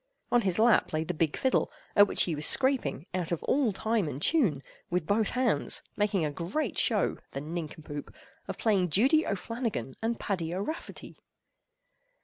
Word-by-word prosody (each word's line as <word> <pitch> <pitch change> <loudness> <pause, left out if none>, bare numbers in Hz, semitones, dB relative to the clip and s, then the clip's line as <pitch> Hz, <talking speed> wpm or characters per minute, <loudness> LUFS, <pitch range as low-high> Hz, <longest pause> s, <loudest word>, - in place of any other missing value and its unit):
On 245 - +4
his 190 -4 0
lap 230 -4 +4
lay 155 0 0
the 175 +2 -3
big 160 -2 0
fiddle, 260 - +1 0.2
at 205 0 +7
which - - +3
he 170 - -1
was 150 0 0
scraping, 260 - +2
out 180 -2 -2
of 170 - -2
all 270 -5 +2
time 215 -1 0
and 140 -2 -5
tune, 175 - +2 0.3
with 180 -2 -1
both 210 +3 +1
hands, 250 -2 0
making 205 -5 +1
a 150 - -2
great 175 - -3
show, - - +2
the 135 - -3
nincompoop! 155 -2 -6 0.4
of - - -5
playing 195 -5 +2
"Judy 270 - +3
O'Flannagan 200 - -3
and 230 +1 -1
Paddy 175 -4 -2
O'Rafferty." 205 - -6
190 Hz, 165 wpm, -29 LUFS, 160-230 Hz, 0.4 s, at